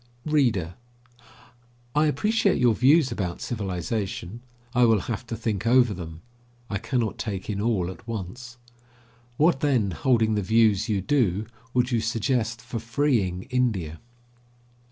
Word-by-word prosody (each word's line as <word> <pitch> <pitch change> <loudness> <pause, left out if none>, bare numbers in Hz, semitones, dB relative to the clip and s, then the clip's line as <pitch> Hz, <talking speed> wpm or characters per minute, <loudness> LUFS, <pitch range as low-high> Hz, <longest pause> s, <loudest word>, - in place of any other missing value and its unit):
READER: 120 - +1 1.2
I 150 +1 +3
appreciate 210 - +2
your 120 -2 +4
views 135 +5 +4
about 90 -7 -3
civilization. 100 0 -4 0.3
I 125 -1 +4
will 110 -4 +4
have 115 +2 -5
to 115 - -4
think 110 -1 -2
over 120 -2 +5
them. 80 -3 -8 0.5
I 100 - -1
cannot 115 -3 -2
take 100 -2 -4
in 100 -1 -3
all 105 -6 +1
at 95 +4 -14
once. 120 +3 -6 0.8
What, 155 -2 +3
then, 125 -10 +1
holding 115 0 +2
the 105 - 0
views 110 0 +3
you 100 -3 +1
do, 105 -4 +1 0.3
would 125 +1 +2
you 120 - +2
suggest 115 +1 -1
for 120 -1 -5
freeing 115 -6 0
India? 100 -12 0
115 Hz, 135 wpm, -25 LUFS, 100-125 Hz, 1.2 s, over